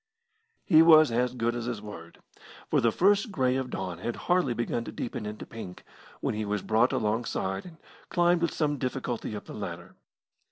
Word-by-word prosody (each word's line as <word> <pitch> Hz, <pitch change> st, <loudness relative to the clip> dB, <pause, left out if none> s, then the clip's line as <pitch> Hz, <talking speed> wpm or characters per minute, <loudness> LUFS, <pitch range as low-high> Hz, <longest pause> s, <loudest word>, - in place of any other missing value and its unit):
He 160 Hz, -3 st, +7 dB
was 155 Hz, -4 st, +7 dB
as 125 Hz, +2 st, 0 dB
good 120 Hz, -1 st, 0 dB
as 120 Hz, -1 st, -4 dB
his 120 Hz, -3 st, -3 dB
word, 100 Hz, -6 st, -10 dB, 0.5 s
for -, -, +3 dB
the 115 Hz, -, +3 dB
first 200 Hz, -, +3 dB
grey 130 Hz, -7 st, +1 dB
of 130 Hz, -1 st, -2 dB
dawn 90 Hz, -7 st, -4 dB
had 120 Hz, +5 st, -3 dB
hardly 175 Hz, -9 st, +1 dB
begun 120 Hz, 0 st, -2 dB
to -, -, -6 dB
deepen 115 Hz, -2 st, -5 dB
into 105 Hz, 0 st, -7 dB
pink 105 Hz, -6 st, -9 dB, 0.4 s
when -, -, -1 dB
he 105 Hz, 0 st, -2 dB
was 105 Hz, -1 st, -2 dB
brought 115 Hz, +3 st, +3 dB
alongside, 110 Hz, -5 st, -1 dB
and 165 Hz, -2 st, -13 dB, 0.3 s
climbed 175 Hz, 0 st, +3 dB
with 170 Hz, -, +1 dB
some 145 Hz, -3 st, -1 dB
difficulty 125 Hz, -4 st, -3 dB
up 105 Hz, -, -7 dB
the -, -, -9 dB
ladder. -, -, -7 dB
120 Hz, 190 wpm, -28 LUFS, 105-155 Hz, 0.5 s, He